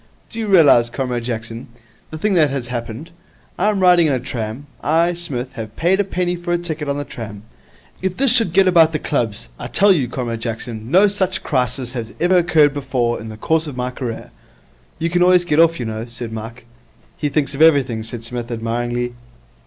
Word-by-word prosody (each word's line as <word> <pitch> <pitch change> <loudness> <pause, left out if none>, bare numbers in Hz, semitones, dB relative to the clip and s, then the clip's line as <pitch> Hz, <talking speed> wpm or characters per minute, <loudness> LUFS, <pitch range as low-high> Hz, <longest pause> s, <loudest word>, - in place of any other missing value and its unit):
Do 230 - -7
you 220 - -2
realize, 150 - +5
Comrade 125 -2 -3
Jackson, 115 0 -5 0.4
the 155 - -7
thing 205 +5 0
that 155 -5 +4
has 135 -3 -4
happened? 120 +6 -6 0.5
I 205 +4 +3
am 200 -2 0
riding 175 -3 +5
in 145 - +1
a 130 - 0
tram. 120 +1 -5 0.2
I, 165 +3 +2
Psmith, 135 -8 -5
have 110 -1 -7
paid 180 +4 +2
a - - +4
penny 180 -2 -1
for 175 0 -5
a 175 - +2
ticket 160 -4 -5
on 140 0 -1
a - - -2
tram. 105 -5 -8 0.6
If 185 -1 -2
this 265 -3 +4
should 230 -8 +3
get 190 +2 +4
about 165 -3 +5
the - - +1
clubs! 115 - -2
I - - -5
tell 200 +1 +4
you, 140 -8 0
Comrade 120 -2 -4
Jackson, 115 -1 -5
no 185 +7 +6
such 190 -2 0
crisis 125 -2 -1
has 115 -3 -6
ever 180 +2 +3
occurred 160 -4 +4
before 130 -4 -1
in 110 - -8
the 110 - -9
course 160 +6 +1
of 140 -4 -7
my 125 0 -2
career.' 125 -3 -6 0.7
'You 165 +1 -2
can 175 +1 +1
always 180 0 +5
get 150 -2 +1
off, 165 0 +4
you 120 - -3
know,' 110 0 -4
said 120 -1 -5
Mike. 115 +2 -8 0.5
'He 145 - -2
thinks 140 -1 0
of 140 - -4
everything,' 140 -8 +4
said 115 +1 -7
Psmith, 120 0 -5
admiringly. 120 +1 -2
140 Hz, 210 wpm, -19 LUFS, 120-175 Hz, 0.7 s, no